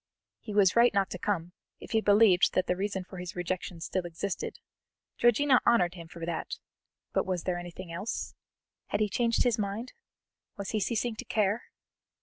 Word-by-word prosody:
He 215 Hz, -, -8 dB
was 195 Hz, -3 st, +5 dB
right 235 Hz, +1 st, +6 dB
not 195 Hz, -1 st, +2 dB
to 180 Hz, -, -5 dB
come, 180 Hz, -4 st, -1 dB, 0.3 s
if -, -, -11 dB
he 220 Hz, -1 st, +3 dB
believed 205 Hz, -3 st, +5 dB
that 185 Hz, -, +3 dB
the 180 Hz, -, +1 dB
reason 195 Hz, 0 st, -2 dB
for 185 Hz, +1 st, -11 dB
his 180 Hz, 0 st, -6 dB
rejection 175 Hz, -1 st, -3 dB
still 185 Hz, +2 st, -2 dB
existed; 175 Hz, +3 st, -4 dB, 0.6 s
Georgiana 250 Hz, +3 st, +5 dB
honoured 180 Hz, -7 st, +4 dB
him 170 Hz, -2 st, -9 dB
for 165 Hz, 0 st, -7 dB
that; 170 Hz, -1 st, -3 dB, 0.6 s
but -, -, +2 dB
was 180 Hz, -3 st, -1 dB
there 180 Hz, -1 st, -1 dB
anything 175 Hz, 0 st, -8 dB
else? 185 Hz, +7 st, -4 dB, 0.5 s
Had 205 Hz, -, -1 dB
he 215 Hz, -, +3 dB
changed 230 Hz, +3 st, +2 dB
his 240 Hz, -2 st, +1 dB
mind? 210 Hz, +5 st, -3 dB, 0.6 s
Was 200 Hz, -1 st, -4 dB
he 215 Hz, -, 0 dB
ceasing 230 Hz, +2 st, -1 dB
to -, -, -6 dB
care? 210 Hz, +1 st, +1 dB
195 Hz, 180 wpm, -29 LUFS, 180-220 Hz, 0.6 s, right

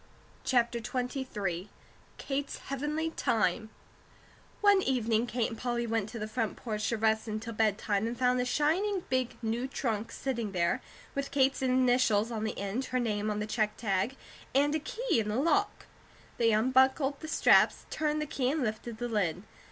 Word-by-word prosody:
CHAPTER 235 Hz, -2 st, +2 dB
XXIII 225 Hz, -7 st, -3 dB, 0.5 s
KATE'S 280 Hz, 0 st, -3 dB
HEAVENLY 300 Hz, +4 st, -1 dB
TIME 220 Hz, -, 0 dB, 0.9 s
ONE 405 Hz, -2 st, +6 dB
evening 235 Hz, -5 st, +1 dB
Kate 235 Hz, -1 st, 0 dB
and 225 Hz, -, -7 dB
Polly 240 Hz, -1 st, -1 dB
went 225 Hz, -2 st, -1 dB
to 235 Hz, -, -7 dB
the 215 Hz, -1 st, -4 dB
front 220 Hz, -1 st, -2 dB
porch 215 Hz, -3 st, -2 dB
to 230 Hz, -, 0 dB
rest 220 Hz, +1 st, +1 dB
until 220 Hz, +2 st, -4 dB
bedtime 215 Hz, -1 st, +1 dB
and 235 Hz, +1 st, -4 dB
found 250 Hz, 0 st, +2 dB
a -, -, -1 dB
shining 350 Hz, +9 st, +1 dB
big 255 Hz, -2 st, 0 dB
new 230 Hz, +3 st, -1 dB
trunk 230 Hz, -5 st, -2 dB
sitting 235 Hz, -6 st, -3 dB
there, 180 Hz, +8 st, +1 dB, 0.3 s
with 280 Hz, 0 st, -2 dB
Kate's 270 Hz, -1 st, +2 dB
initials 250 Hz, -4 st, +3 dB
on 220 Hz, -1 st, -2 dB
the 220 Hz, -, -3 dB
end, 200 Hz, +7 st, -2 dB
her 255 Hz, -, -1 dB
name 215 Hz, -3 st, -1 dB
on 210 Hz, -, -1 dB
the 210 Hz, -, -1 dB
check 215 Hz, -1 st, -1 dB
tag, 205 Hz, +3 st, 0 dB, 0.4 s
and 290 Hz, +2 st, +4 dB
a 315 Hz, -, +1 dB
key 440 Hz, -, -1 dB
in 210 Hz, -1 st, -1 dB
the 210 Hz, -, -1 dB
lock. 335 Hz, -, +1 dB, 0.5 s
They 230 Hz, -1 st, +4 dB
unbuckled 265 Hz, +5 st, +3 dB
the 315 Hz, -, -7 dB
straps, -, -, +4 dB
turned 305 Hz, -1 st, 0 dB
the 300 Hz, -, -1 dB
key, 270 Hz, -4 st, -1 dB
and 295 Hz, 0 st, 0 dB
lifted 220 Hz, 0 st, -3 dB
the 240 Hz, +1 st, -3 dB
lid. 190 Hz, -6 st, -1 dB
240 Hz, 175 wpm, -30 LUFS, 215-270 Hz, 0.9 s, ONE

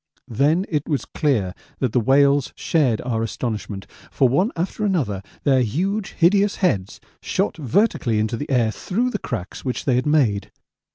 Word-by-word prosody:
Then 150 Hz, -, +2 dB
it 150 Hz, -2 st, -2 dB
was 145 Hz, -3 st, -1 dB
clear 115 Hz, -, 0 dB, 0.2 s
that 130 Hz, -4 st, -1 dB
the 125 Hz, -, +2 dB
whales 140 Hz, +3 st, +3 dB
shared 135 Hz, -9 st, +1 dB
our 115 Hz, -3 st, -2 dB
astonishment, 110 Hz, -3 st, -4 dB, 0.2 s
for 135 Hz, -, +3 dB
one 180 Hz, -, +2 dB
after 180 Hz, +5 st, -3 dB
another 145 Hz, -, 0 dB, 0.2 s
their 135 Hz, -2 st, +4 dB
huge 190 Hz, -, -1 dB
hideous 200 Hz, +4 st, +3 dB
heads 100 Hz, -, 0 dB, 0.2 s
shot -, -, -1 dB
vertically 150 Hz, -, +1 dB
into 110 Hz, +2 st, 0 dB
the 145 Hz, +6 st, -5 dB
air 120 Hz, -5 st, +2 dB
through 235 Hz, -, -1 dB
the -, -, -3 dB
cracks 105 Hz, -7 st, -5 dB
which 130 Hz, -2 st, -3 dB
they 135 Hz, -, +2 dB
had 130 Hz, -, 0 dB
made. 130 Hz, -10 st, +2 dB
135 Hz, 165 wpm, -22 LUFS, 115-170 Hz, 0.2 s, their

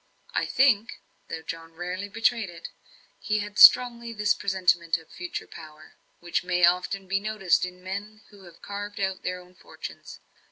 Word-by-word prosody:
I -, -, 0 dB
think 235 Hz, -5 st, +2 dB, 0.3 s
though 160 Hz, -, -6 dB
John 165 Hz, 0 st, -8 dB
rarely 180 Hz, +4 st, -5 dB
betrayed 225 Hz, 0 st, 0 dB
it 170 Hz, -, -9 dB, 0.5 s
he 215 Hz, -, -1 dB
had 205 Hz, 0 st, -4 dB
strongly 235 Hz, -2 st, +7 dB
this 210 Hz, -1 st, +2 dB
presentiment 180 Hz, -4 st, +1 dB
of 160 Hz, -1 st, -17 dB
future 180 Hz, -1 st, -6 dB
power, 155 Hz, -1 st, -13 dB, 0.3 s
which 175 Hz, +1 st, -2 dB
may 180 Hz, -1 st, +3 dB
often 180 Hz, +2 st, 0 dB
be 195 Hz, +1 st, +1 dB
noticed 205 Hz, -4 st, +1 dB
in 180 Hz, 0 st, -11 dB
men 205 Hz, +3 st, -6 dB
who 200 Hz, -2 st, -16 dB
have 170 Hz, -1 st, -17 dB
carved 205 Hz, 0 st, -6 dB
out 190 Hz, -1 st, -2 dB
their 180 Hz, 0 st, -3 dB
own 180 Hz, 0 st, -17 dB
fortunes. -, -, -10 dB
190 Hz, 165 wpm, -26 LUFS, 175-210 Hz, 0.5 s, strongly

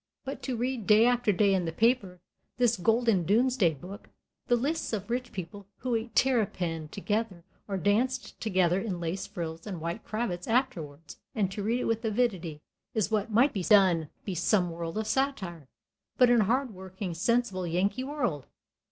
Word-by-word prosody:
But 270 Hz, -, -5 dB
to 255 Hz, -3 st, -3 dB
read 245 Hz, -3 st, -2 dB
day 215 Hz, +2 st, +6 dB
after 245 Hz, -3 st, +3 dB
day 200 Hz, +1 st, +3 dB
in 185 Hz, -2 st, +1 dB
the 165 Hz, -, -2 dB
paper, 200 Hz, -3 st, +1 dB, 0.4 s
this 240 Hz, -2 st, +3 dB
golden 225 Hz, -1 st, +2 dB
domesday 210 Hz, -3 st, +3 dB
book, 190 Hz, -, -10 dB, 0.4 s
the 245 Hz, -, +4 dB
lists 280 Hz, +3 st, -1 dB
of 210 Hz, +1 st, -3 dB
rich 245 Hz, 0 st, -2 dB
people 190 Hz, +1 st, -7 dB
who 250 Hz, -1 st, -2 dB
ate 230 Hz, +1 st, -2 dB
terrapin 180 Hz, -11 st, +1 dB
together, 205 Hz, 0 st, -3 dB, 0.2 s
or 195 Hz, -2 st, -2 dB
danced 240 Hz, +8 st, 0 dB
together 185 Hz, -3 st, +2 dB
in 195 Hz, -5 st, -3 dB
lace 180 Hz, +3 st, -3 dB
frills 165 Hz, -2 st, -6 dB
and 185 Hz, -5 st, -5 dB
white 170 Hz, +2 st, -4 dB
cravats 205 Hz, -5 st, -3 dB
afterwards, 165 Hz, -, -2 dB, 0.2 s
and 195 Hz, -4 st, 0 dB
to 205 Hz, +2 st, -4 dB
read 230 Hz, +5 st, 0 dB
it -, -, -2 dB
with 225 Hz, +1 st, 0 dB
avidity, 200 Hz, -9 st, -1 dB, 0.3 s
is 215 Hz, -1 st, +1 dB
what 215 Hz, 0 st, 0 dB
might 240 Hz, +6 st, +4 dB
be 195 Hz, -, -2 dB
done 180 Hz, -6 st, +4 dB, 0.2 s
in 190 Hz, -, -3 dB
some 180 Hz, +1 st, +2 dB
world 165 Hz, +2 st, -5 dB
of 220 Hz, -, -1 dB
satire. 210 Hz, -, -2 dB, 0.5 s
But 250 Hz, -1 st, +6 dB
in 240 Hz, -2 st, +5 dB
a -, -, +2 dB
hard 250 Hz, +2 st, 0 dB
working, 190 Hz, 0 st, -6 dB
sensible, 190 Hz, 0 st, 0 dB
Yankee 195 Hz, +9 st, 0 dB
world! 245 Hz, -, -2 dB
205 Hz, 180 wpm, -29 LUFS, 180-240 Hz, 0.5 s, day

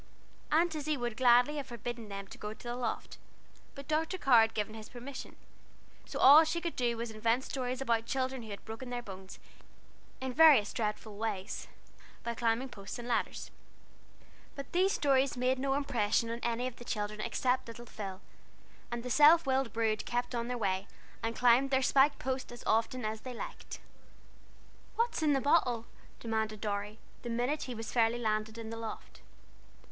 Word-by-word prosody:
Aunt 330 Hz, +2 st, +3 dB
Izzie 305 Hz, -1 st, -1 dB
would 240 Hz, -2 st, -3 dB
gladly 250 Hz, +4 st, +5 dB
have 280 Hz, -2 st, -4 dB
forbidden 235 Hz, -2 st, -6 dB
them 200 Hz, 0 st, -6 dB
to -, -, -10 dB
go 210 Hz, +1 st, -5 dB
the 240 Hz, +1 st, -6 dB
loft, 245 Hz, -2 st, -4 dB, 0.6 s
but 280 Hz, -1 st, -9 dB
Dr. 320 Hz, +4 st, 0 dB
Carr 255 Hz, -9 st, +6 dB
had 225 Hz, 0 st, +1 dB
given 215 Hz, 0 st, -2 dB
his 220 Hz, -1 st, -9 dB
permission, 255 Hz, +2 st, -8 dB, 0.7 s
so -, -, -5 dB
all 290 Hz, +4 st, +9 dB
she 320 Hz, +2 st, -1 dB
could 340 Hz, -1 st, -4 dB
do 240 Hz, -2 st, 0 dB
was 235 Hz, 0 st, -3 dB
to -, -, -11 dB
invent 230 Hz, +4 st, +2 dB
stories 255 Hz, -1 st, -3 dB
about 230 Hz, -3 st, 0 dB
children 260 Hz, -1 st, -1 dB
who 220 Hz, -, -10 dB
had 200 Hz, -, -8 dB
broken 225 Hz, +3 st, -7 dB
their 245 Hz, 0 st, -4 dB
bones 190 Hz, -2 st, -10 dB, 0.8 s
in 260 Hz, -1 st, -4 dB
various 290 Hz, -8 st, +6 dB
dreadful 210 Hz, -1 st, -3 dB
ways, 210 Hz, -2 st, -3 dB, 0.6 s
by 235 Hz, -, -2 dB
climbing 235 Hz, +3 st, 0 dB
posts 200 Hz, -4 st, -8 dB
and 240 Hz, 0 st, -7 dB
ladders. 240 Hz, -, -2 dB, 1.0 s
But 275 Hz, -1 st, -8 dB
these 375 Hz, +2 st, +3 dB
stories 270 Hz, -2 st, +2 dB
made 255 Hz, +1 st, +1 dB
no 270 Hz, 0 st, 0 dB
impression 230 Hz, -5 st, +1 dB
on 235 Hz, -, -4 dB
any 235 Hz, +1 st, -1 dB
of 255 Hz, -1 st, -5 dB
the -, -, -10 dB
children 210 Hz, -2 st, -3 dB
except 250 Hz, +3 st, 0 dB
little 240 Hz, +1 st, -9 dB
Phil, 195 Hz, -4 st, -7 dB, 0.7 s
and 240 Hz, 0 st, -4 dB
the 250 Hz, -, -4 dB
self 305 Hz, +4 st, +7 dB
willed 265 Hz, -3 st, +1 dB
brood 220 Hz, -1 st, 0 dB
kept 245 Hz, +1 st, -1 dB
on 235 Hz, -1 st, -2 dB
their 250 Hz, 0 st, -2 dB
way, 195 Hz, -3 st, -1 dB, 0.3 s
and 225 Hz, 0 st, -2 dB
climbed 250 Hz, +3 st, +4 dB
their 265 Hz, -1 st, +2 dB
spiked 275 Hz, +2 st, +4 dB
post 260 Hz, -1 st, -3 dB
as 240 Hz, -, -10 dB
often 225 Hz, +2 st, +1 dB
as 215 Hz, 0 st, -3 dB
they 255 Hz, -1 st, -7 dB
liked. -, -, -7 dB, 1.2 s
"What's 465 Hz, -5 st, 0 dB
in 300 Hz, -2 st, +3 dB
the 270 Hz, -, +1 dB
bottle?" 250 Hz, -6 st, +2 dB, 0.3 s
demanded 220 Hz, -2 st, -2 dB
Dorry, 205 Hz, 0 st, -3 dB, 0.2 s
the 240 Hz, -, -6 dB
minute 245 Hz, +6 st, -1 dB
he 250 Hz, -, -5 dB
was 225 Hz, -1 st, -6 dB
fairly 230 Hz, -1 st, +2 dB
landed 215 Hz, -1 st, -1 dB
in 225 Hz, -1 st, -6 dB
the 230 Hz, -, -5 dB
loft. 225 Hz, -1 st, -8 dB
240 Hz, 185 wpm, -32 LUFS, 220-265 Hz, 1.2 s, all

